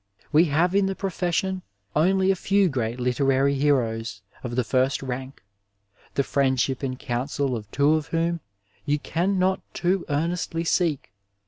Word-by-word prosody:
We 160 +3 +6
have 170 +4 +2
in 195 0 +3
the 195 - -2
profession 190 0 -1 0.3
only 190 +4 +3
a - - +1
few 195 +1 +2
great 120 -3 -2
literary 135 +2 +2
heroes 115 -7 0 0.2
of 120 -1 -4
the 125 - +2
first 130 +3 +1
rank, 130 0 -6 0.7
the 140 - +2
friendship 130 -1 +1
and 130 -2 -3
counsel 130 +2 -2
of 105 -2 -7
two 145 +6 +3
of 155 -1 0
whom 165 +1 0 0.4
you 145 0 +1
can 180 +6 -1
not 185 +1 +2
too 185 +1 +1
earnestly 165 +2 -1
seek. 165 - 0
145 Hz, 150 wpm, -25 LUFS, 130-175 Hz, 0.7 s, We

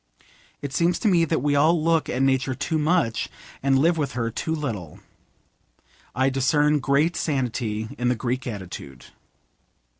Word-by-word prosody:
It 140 -1 -4
seems 170 +3 +2
to - - -1
me 175 -4 +4
that 160 -4 -1
we 145 -1 +2
all 160 +4 +4
look 165 0 +1
at 130 +2 0
Nature 130 -1 +1
too 155 +4 -1
much, 150 -8 +1 0.3
and 135 0 +3
live 165 +4 +3
with 140 -3 -1
her 115 -2 -2
too 160 +7 -2
little. 110 - -5 1.2
I 130 +1 +2
discern 145 +3 +2
great 140 +5 +2
sanity 120 -6 -2
in 125 - 0
the 125 - +2
Greek 125 +2 -3
attitude. 90 - -8
135 Hz, 155 wpm, -24 LUFS, 125-155 Hz, 1.2 s, me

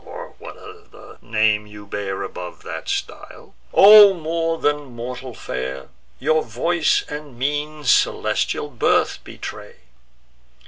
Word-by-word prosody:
or - - -10
what - - -10
other 430 0 -15
name 105 -2 +1
you 105 0 -12
bear 100 -1 -4
Above 90 -1 -8
that - - -7
style; - - -6 0.2
O 205 -1 +9
more 165 0 -2
than 145 -5 -2
mortal 125 +1 -7
fair! 65 +1 -6 0.3
Your 155 - +1
voice 155 +8 0
and 150 -4 -8
mien 150 +3 -3
celestial 145 +2 +1
birth 120 - +1
betray! - - -9
140 Hz, 120 wpm, -21 LUFS, 105-160 Hz, 0.3 s, O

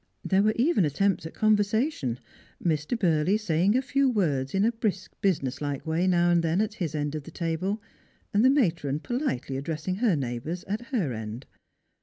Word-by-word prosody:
There 195 0 +3
were 215 +1 +2
even 250 - +3
attempts 160 +3 +1
at - - -12
conver 215 -1 +4
sation: 205 - 0 0.5
Mr. 155 +7 0
Burley 175 -1 +2
saying 195 +2 +2
a 260 - 0
few 275 +1 +2
words 150 - 0
in 195 +2 +3
a 230 - +3
brisk 205 -5 -3
business 150 -10 0
like 145 -2 -3
way 165 +3 +1
now 175 -1 +3
and 170 -1 +3
then 165 +3 +1
at 215 0 0
his 160 -3 -1
end 145 -1 -1
of 155 - -3
the 145 - -11
table, 170 +5 -2 0.5
and 205 +2 +4
the 260 - +7
matron 170 - +1
politely 240 - -2
addressing 160 +6 -3
her 220 -5 +3
neighbours 135 +6 -3
at 215 +4 -4
her 190 - -1
end. 110 +3 -6
175 Hz, 190 wpm, -27 LUFS, 150-215 Hz, 0.5 s, the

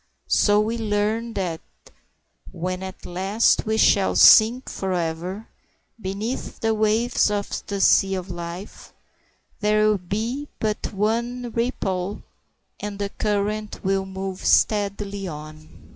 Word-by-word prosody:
So 205 0 +3
we 225 +2 -1
learn 220 +2 -1
that 175 -4 -2 0.9
when 185 +2 -4
at 190 0 -8
last 195 +6 +1
we 220 0 +1
shall 200 -3 +4
sink 235 +4 +7
forever 180 +2 -3 0.5
beneath 205 +6 -4
the 225 0 +1
waves 220 +2 +2
of 205 -1 -2
the 200 -1 -3
sea 195 0 +4
of 185 -1 -5
life, 175 +3 -8 0.6
there 215 0 +3
will 210 -2 +2
be 225 +10 -3
but 215 -1 -2
one 235 +4 -1
ripple, 205 -5 -2 0.6
and 205 -1 -5
the 200 0 -2
current 210 +1 -2
will 195 0 0
move 190 0 -6
steadily 200 -1 +1
on. 155 -1 -9
205 Hz, 120 wpm, -23 LUFS, 190-220 Hz, 0.9 s, sink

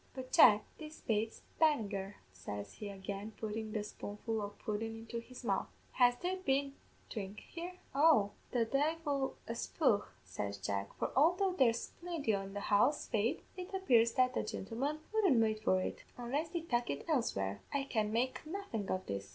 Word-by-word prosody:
But, 260 -1 -6
Jack, 210 -3 +8 0.2
this 310 0 -9
bates 220 0 -1 0.2
Bannagher,' 210 -11 +2 0.2
says 100 +2 -6
he 205 - -6
again, 200 +2 -5
puttin' 220 0 -3
the 215 -1 -1
spoonful 210 +1 -4
o' 205 - -3
pudden 220 +2 -4
into 230 +1 -5
his 250 +2 -11
mouth; - - 0 0.2
'has 245 -1 +5
there 360 +6 -2
been 275 -5 +1 0.4
dhrink 200 -2 -5
here?' 350 +2 -7 0.2
"'Oh, 275 -8 +5 0.2
the 240 -2 +2
divle 285 +1 0
a 230 - -2
spudh,' 230 -3 +1 0.2
says 100 +2 -4
Jack, 100 0 -2
'for - - -1
although 360 +7 +4
there's 240 -8 +2
plinty 335 -8 -3
in 195 -1 -2
the 205 - -2
house, 215 +8 +3
faith, 220 +2 +1
it 365 0 -6
appears 235 -11 +4
the 255 - +5 0.2
gintlemen 270 +10 -3
wouldn't 390 - +4
wait 220 -1 +2
for 185 -3 +3
it. - - -3
Unless 275 +7 -1
they 340 0 -2
tuck 245 -7 0
it 140 - -3
elsewhere, 100 - 0
I 280 -1 0
can 215 -6 0
make 245 +3 0
nothin' 310 - -4
of 185 0 -1
this.' 100 0 -4
230 Hz, 170 wpm, -35 LUFS, 205-285 Hz, 0.4 s, Jack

